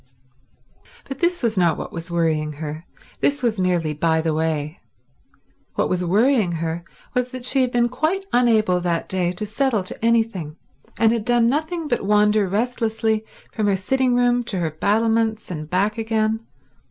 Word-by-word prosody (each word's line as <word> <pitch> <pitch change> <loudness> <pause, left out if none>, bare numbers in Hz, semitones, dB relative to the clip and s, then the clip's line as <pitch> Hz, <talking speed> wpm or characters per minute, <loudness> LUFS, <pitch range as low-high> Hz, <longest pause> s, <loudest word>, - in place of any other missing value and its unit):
But 270 0 -6
this 345 -3 0
was 220 -4 +1
not 170 -3 +3
what - - -6
was 165 +1 -5
worrying 160 -3 0
her; 155 +2 -7 0.3
this 285 -2 0
was 225 -4 0
merely 175 -4 +1
by 160 +2 +1
the 160 0 0
way. 155 -1 -2 1.0
What - - 0
was 180 0 0
worrying 210 +1 +2
her 165 +1 -3 0.3
was 250 0 0
that 255 -1 -8
she 265 +1 +2
had 250 -1 +1
been 240 -1 +2
quite 315 +10 -1
unable 220 -7 +3
that 170 -1 -1
day 180 -2 0
to 210 +4 -4
settle 220 -1 0
to 185 - -6
anything, 225 -9 +1 0.4
and 225 -1 +4
had 230 -2 -1
done 240 0 +3
nothing 315 +6 -1
but 240 - 0
wander 210 0 +3
restlessly 220 0 0 0.3
from 215 -2 0
her 200 - +3
sitting 255 +6 +1
room 245 0 +2
to 200 - -3
her 165 -3 -1
battlements 220 +5 0
and 155 -3 -6
back 200 +5 0
again. 220 0 -1
215 Hz, 170 wpm, -22 LUFS, 175-240 Hz, 1.0 s, and